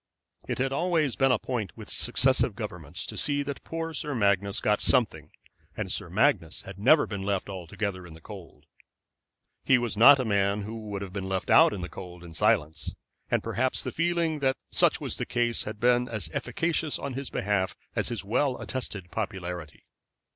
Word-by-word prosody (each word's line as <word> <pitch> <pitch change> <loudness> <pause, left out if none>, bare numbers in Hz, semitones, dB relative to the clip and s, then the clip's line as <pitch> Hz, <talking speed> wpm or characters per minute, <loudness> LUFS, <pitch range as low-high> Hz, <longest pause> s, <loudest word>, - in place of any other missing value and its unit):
It - - -2
had 135 +1 0
always 160 -4 +1
been 135 -1 +3
a 125 - +4
point 110 -5 -4
with - - -9
successive - - +2
governments - - -6
to - - -6
see 145 0 +1
that 140 -1 -6
poor 165 0 -4
Sir 145 -1 -2
Magnus 100 -2 +2
got 105 0 +1
something, 125 -6 +1 0.5
and - - -3
Sir - - -2
Magnus - - +1
had 95 0 -10
never 145 +9 +5
been 100 -2 -5
left 100 0 -2
altogether 95 0 -4
in 80 - -12
the - - -13
cold. 95 -2 -12 1.0
He 135 - +5
was 120 -2 -2
not 135 +6 +9
a 130 - 0
man 100 -1 +1
who 110 +1 -7
would 100 -1 -4
have 95 -2 -8
been 95 -1 -4
left 95 -1 -2
out - - +7
in 100 - -5
the 90 - -4
cold 90 -2 -10
in 85 -1 -10
silence, 80 0 +1 0.3
and - - +1
perhaps 120 +4 0
the - - -3
feeling 170 -2 0
that 135 -1 +1
such - - +4
was - - -2
the - - -2
case 120 -1 0
had 105 0 -6
been 125 +1 +3
as 105 -9 -3
efficacious 160 +4 0
on 140 - -5
his 135 +1 -4
behalf 95 -2 -1 0.2
as - - 0
his 110 -5 -3
well 130 +5 +1
attested 100 -8 -4
popularity. 90 -6 -5
110 Hz, 190 wpm, -27 LUFS, 95-135 Hz, 1.0 s, not